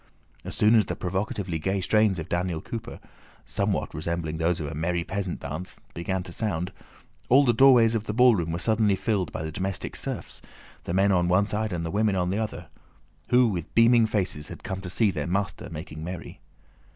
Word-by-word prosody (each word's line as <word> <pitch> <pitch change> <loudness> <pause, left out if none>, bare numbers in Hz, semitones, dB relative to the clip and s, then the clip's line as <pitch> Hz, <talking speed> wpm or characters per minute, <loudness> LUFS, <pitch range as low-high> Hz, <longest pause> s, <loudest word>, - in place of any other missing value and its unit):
As - - -6
soon 105 +2 +4
as 110 -2 +4
the - - -2
provocatively 95 -2 -2
gay 95 +5 -1
strains 100 +1 +2
of 80 0 -5
Daniel 85 -2 -1
Cooper 115 +7 -7 0.5
(somewhat - - -1
resembling 80 0 -3
those 85 +1 +1
of 80 - -3
a 75 - -5
merry 85 +3 -1
peasant 95 -1 -3
dance) 80 +5 -6
began 90 +2 -2
to 90 - -10
sound, 90 -2 -2 0.6
all 140 +3 +6
the 120 - +4
doorways 120 -2 +6
of 110 -1 -2
the - - 0
ballroom 110 -10 +4
were 85 - -2
suddenly 110 +1 +2
filled 95 -2 -1
by 80 - -4
the 80 - -4
domestic 95 +3 -3
serfs—the - - -8
men 100 +1 +4
on 90 -2 +2
one 90 +3 +3
side 110 0 -2
and 85 -2 -2
the 85 - -3
women 105 -1 +2
on 90 -1 0
the 100 - -1
other—who 120 +2 -2
with 90 -7 -4
beaming 115 0 +6
faces 90 -8 -2
had - - -10
come 95 0 -4
to 90 - -7
see 105 +3 +2
their 75 -3 -3
master 95 +2 -2
making 80 -1 -7
merry. 85 0 -7
95 Hz, 195 wpm, -26 LUFS, 85-110 Hz, 0.6 s, all